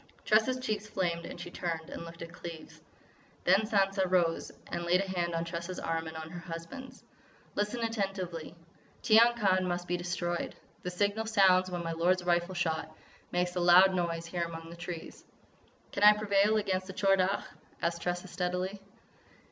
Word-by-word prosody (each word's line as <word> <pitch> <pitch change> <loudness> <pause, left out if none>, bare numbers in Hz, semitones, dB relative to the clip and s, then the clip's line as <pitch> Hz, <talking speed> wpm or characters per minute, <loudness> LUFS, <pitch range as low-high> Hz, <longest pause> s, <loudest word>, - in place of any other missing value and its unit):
Tressa's 220 +4 +3
cheeks 215 -4 -2
flamed 175 -4 -2
and - - -8
she 175 - -7
turned 165 -3 -4
and - - -6
looked 165 0 -9
at 170 +1 -10
Cleves. 165 -3 -9 0.6
Then 195 +4 +4
Sansa 195 -3 +2
rose 175 -3 +1 0.2
and 170 - -2
laid 175 +1 +3
a 195 - -1
hand 175 -2 -1
on 165 0 -1
Tressa's 170 +2 -5
arm 165 0 -2
and 160 0 -7
on 160 0 -7
her 175 - -6
husband's: 170 +11 -8 0.5
"Listen 210 +4 -1
attentively. 195 -8 -3 0.5
Tiyang 230 +2 +6
Khan 185 -4 +2
must 175 0 -2
be 180 - 0
destroyed. 175 0 -2 0.3
The 180 - -3
signal 205 +4 0
sounds 190 -4 +5
when 175 -1 -3
my 165 - -2
lord's 175 +3 +2
rifle 175 +1 +1
shot 160 -2 -2 0.3
makes 180 0 0
a - - 0
loud 180 +2 +7
noise 170 -2 -1
here 175 +1 -3
among 165 -1 -5
these 170 - -11
trees." 175 -2 -7 0.7
"Can - - -4
I 210 0 +10
prevail 210 0 +3
against 190 -3 -1
the 190 - -7
Tchor 195 0 +3
Dagh?" 190 +2 +1 0.4
asked 170 0 -1
Tressa, 175 +1 -2
steadily. 180 +2 -2
180 Hz, 175 wpm, -31 LUFS, 170-195 Hz, 0.7 s, I